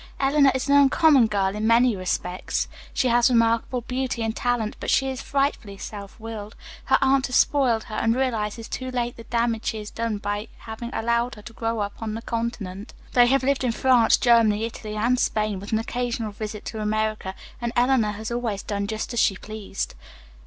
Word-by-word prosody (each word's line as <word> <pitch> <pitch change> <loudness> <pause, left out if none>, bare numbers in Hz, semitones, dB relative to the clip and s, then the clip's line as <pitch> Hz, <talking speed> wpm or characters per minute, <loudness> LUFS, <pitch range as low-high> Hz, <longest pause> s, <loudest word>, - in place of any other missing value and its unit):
Eleanor 275 0 +4
is 260 - -2
an 280 - +4
uncommon 285 -2 +5
girl 200 -2 0
in 215 +1 -1
many 235 0 +4
respects. 185 -1 -2 0.2
She 255 - +1
has 240 +1 +4
remarkable 230 +1 +2
beauty 250 -1 -2
and 225 0 -2
talent, 245 -4 -1
but - - -4
she 270 0 +3
is 260 0 -5
frightfully 275 -9 -1
self 200 0 -8
willed. 220 -1 -7 0.3
Her - - +4
aunt 270 0 +3
has 250 - -3
spoiled 250 -6 +3
her, 215 - -11
and 225 +1 +1
realizes 230 -3 -1
too 255 0 -5
late 240 -1 -2
the 230 - -11
damage 235 -1 0
she 220 - -1
has 210 -1 -7
done 230 -2 -2
by 205 +1 -3
having 230 +1 -7
allowed 235 0 0
her 210 - -13
to 235 - -10
grow 225 -1 -2
up 205 +2 -5
on 220 -1 -3
the 225 - -6
continent. 230 -4 -4 0.2
They 245 -1 +6
have 270 +1 +3
lived 275 0 +1
in 245 -2 +1
France, 240 -1 +4
Germany, 225 -3 +4
Italy 215 -2 -6
and 240 +4 +1
Spain, 215 -5 0
with 200 - -8
an 220 - +3
occasional 230 -1 -2
visit 210 0 -6
to 220 -2 -5
America, 215 -2 -1 0.3
and 235 -1 -1
Eleanor 245 -4 +3
has 220 +2 -6
always 235 -4 -2
done 200 -1 -2
just 220 +3 -4
as 235 - 0
she 195 - +3
pleased. 215 -2 -5
230 Hz, 200 wpm, -24 LUFS, 215-245 Hz, 0.3 s, They